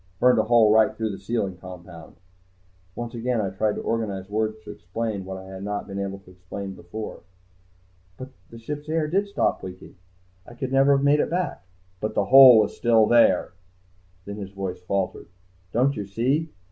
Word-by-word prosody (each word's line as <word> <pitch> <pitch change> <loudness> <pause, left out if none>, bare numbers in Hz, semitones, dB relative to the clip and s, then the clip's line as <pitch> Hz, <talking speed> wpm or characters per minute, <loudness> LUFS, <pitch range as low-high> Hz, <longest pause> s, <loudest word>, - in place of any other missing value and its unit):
Burned 125 -1 +4
a - - +3
hole 115 -2 +5
right 110 -1 +5
through 110 -1 -2
the 95 - -7
sealing 100 -3 -3
compound 90 -2 -12 0.4
" 90 0 -36
Once 120 0 -6
again 120 0 -1
I 100 -3 -2
tried 105 +2 -1
to - - -6
organize 100 -4 -3
words 110 0 -1
to - - -8
explain 100 +2 -5
what 95 0 -6
I 95 - -10
had 95 0 -9
not 105 0 -3
been 100 0 -6
able 100 0 -4
to 90 - -18
explain 95 +2 -8
before. 105 +5 -8 1.0
"But 130 - -8 0.2
the 115 - -11
ship's 145 +6 -7
air 160 -1 0
did 195 +6 0
stop 200 - 0
leaking. 95 +1 -10 0.5
I 120 - -14
could 130 +1 -4
never 135 +1 +5
have 135 - -1
made 145 +1 +4
it - - 0
back...." 175 - -3 0.3
"But 110 - -4
the 100 - +1
hole 130 +1 +9
was 105 -1 +2
still 115 -2 +4
there!" 115 -5 +4 0.7
Then 100 +1 -7
his 100 -2 -6
voice 95 -2 -6
faltered. 95 +1 -3 0.4
"Don't 130 +4 +2
you 100 -2 -5
see? 130 +10 0
110 Hz, 195 wpm, -24 LUFS, 95-120 Hz, 1.0 s, hole